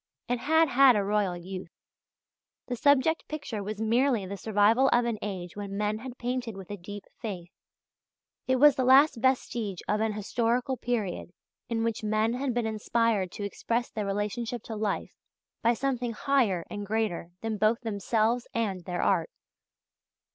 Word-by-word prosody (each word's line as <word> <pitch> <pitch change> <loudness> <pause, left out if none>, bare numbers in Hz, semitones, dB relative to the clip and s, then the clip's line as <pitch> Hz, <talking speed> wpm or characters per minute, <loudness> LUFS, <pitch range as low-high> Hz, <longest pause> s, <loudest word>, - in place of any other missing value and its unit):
It 245 0 0
had 320 +4 +3
had 265 -1 +6
a 205 - +2
royal 200 -3 0
youth. 180 0 -7 1.0
The 245 - -3
subject 285 +5 +3
picture 280 -8 -5
was 210 +1 -5
merely 230 0 +2
the 195 +2 -5
survival 220 +6 +3
of 240 0 +3
an 230 -3 -2
age 185 -4 -5
when 200 -1 -5
men 210 +1 -1
had 250 +1 -8
painted 245 -3 -3
with 195 0 -9
a - - -3
deep 205 +2 -9 0.2
faith. 180 -6 -6 1.0
It 260 - +3
was 290 +2 +6
the 260 - 0
last 265 +2 +6
vestige 235 -6 0
of 210 +1 +1
an 220 -1 0
historical 235 +5 0
period 215 -8 -3 0.4
in 225 -1 0
which 230 -1 -2
men 215 +2 +1
had 260 +1 -1
been 240 -1 -1
inspired 220 -3 0
to 205 - -6
express 230 +4 -2
their 210 -2 -3
relationship 210 +4 -2
to 225 - -6
life 210 -2 -2 0.5
by 235 +1 +3
something 250 -2 -1
higher 225 -10 +1
and 205 - -5
greater 205 -5 -2
than 220 -2 -3
both 215 +3 +2
themselves 225 +2 0
and 195 -6 -1
their 180 -1 -2
art. - - +2
225 Hz, 165 wpm, -28 LUFS, 205-245 Hz, 1.0 s, had